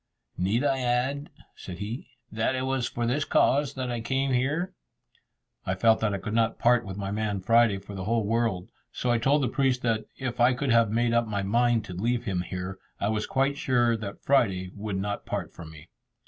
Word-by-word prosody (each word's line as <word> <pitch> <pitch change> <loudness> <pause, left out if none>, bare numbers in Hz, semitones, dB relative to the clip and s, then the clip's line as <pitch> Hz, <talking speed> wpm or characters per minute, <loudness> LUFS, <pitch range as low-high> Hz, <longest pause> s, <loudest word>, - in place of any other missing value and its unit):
"Need 100 +8 0
I 135 -2 +1
add," 130 +4 0 0.3
said 90 - -8
he, 105 +6 -5 0.2
"that 115 +4 0
it 130 - -2
was 130 -2 0
for 120 - -2
this 135 +5 +1
cause 140 +1 +2
that 130 -2 -3
I 120 -1 -3
came 135 +3 0
here?" 150 +9 0 0.9
I 95 - -1
felt 110 +3 +4
that 110 -1 +1
I 100 - -1
could 105 +2 -5
not 115 0 +1
part 120 0 +3
with 95 0 -6
my 100 -1 -3
man 105 -1 -1
Friday 115 +1 +4
for 100 +1 -10
the 95 -1 -5
whole 115 0 +1
world, 110 -4 0 0.2
so 125 - -1
I 120 - +2
told 140 +5 +3
the - - +2
priest 130 0 +1
that 110 -2 0
if 125 -2 -4
I 125 +1 +5
could 130 0 -1
have 115 -1 +4
made 115 +2 +1
up 120 -1 +2
my 100 -2 -2
mind 120 +2 +2
to 90 - -7
leave 115 +7 -1
him 95 -6 -1
here, 90 +1 -5 0.2
I 100 - 0
was 110 -1 -1
quite 135 +1 +1
sure 120 -2 +2
that 105 -3 -7
Friday 95 -9 +2
would 105 -1 -4
not 100 +1 -3
part - - -4
from 80 -2 -10
me. 80 +1 -13
115 Hz, 220 wpm, -27 LUFS, 100-125 Hz, 0.9 s, I